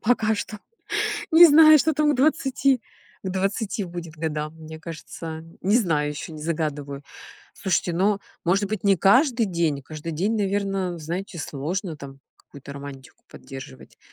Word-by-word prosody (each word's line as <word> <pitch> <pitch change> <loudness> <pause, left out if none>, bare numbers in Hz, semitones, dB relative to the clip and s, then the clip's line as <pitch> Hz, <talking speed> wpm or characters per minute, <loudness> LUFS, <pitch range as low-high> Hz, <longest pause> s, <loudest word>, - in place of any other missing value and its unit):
пока 220 -2 +2
что. 210 0 -5 0.7
Не 340 +2 +10
знаю, 310 0 +8
что 315 +3 +2
там 300 0 +3
к - - -1
20. 270 -2 +2 0.4
К 190 - -2
20 195 +2 -1
будет 170 -2 -8
годам. 155 -1 -3
Мне 160 0 -10
кажется- 160 0 -7 0.2
не 200 +4 +3
знаю 155 -10 +1
ещё, 150 +2 -7
не 155 -1 -8
загадываю. 150 -3 -3 0.5
Слушайте, 185 -2 0
ну, 195 +4 +2 0.3
может 195 +4 +2
быть, 210 -3 -4
не 200 -1 +5
каждый 240 - +4
день. 165 -6 -1
Каждый 155 +3 -7
день, 195 +8 0
наверно, 195 -3 -1
знаете, 175 +4 -5
сложно 160 +5 -4
там 135 -1 -11 0.2
какую-то 140 0 -12
романтику 140 -2 -10
поддерживать. 130 -1 -11
175 Hz, 150 wpm, -24 LUFS, 155-210 Hz, 0.7 s, Не